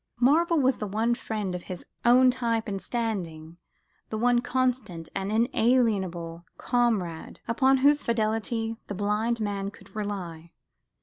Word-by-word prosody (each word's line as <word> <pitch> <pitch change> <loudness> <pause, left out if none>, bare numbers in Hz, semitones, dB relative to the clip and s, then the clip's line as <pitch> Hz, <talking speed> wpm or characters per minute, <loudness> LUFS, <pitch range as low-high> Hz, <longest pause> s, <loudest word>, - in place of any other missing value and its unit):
Marvell 325 +6 +4
was 260 -2 +3
the 210 - -3
one 220 +4 +1
friend 215 -6 -3
of 180 - -4
his 180 -2 -7 0.2
own 255 +2 +6
type 235 -3 -1
and 195 -2 -3
standing, 175 -9 -4 0.5
the 220 - -3
one 240 +1 +3
constant 250 -10 -1
and 195 +1 -3
inalienable 215 -8 +1
comrade, 220 -10 -1
upon 265 +3 +3
whose 285 +2 +4
fidelity 225 0 -1
the 200 - -5
blind 210 +4 0
man 200 -2 -2
could 205 - -17
rely. 180 -6 -5
220 Hz, 135 wpm, -27 LUFS, 195-245 Hz, 0.5 s, own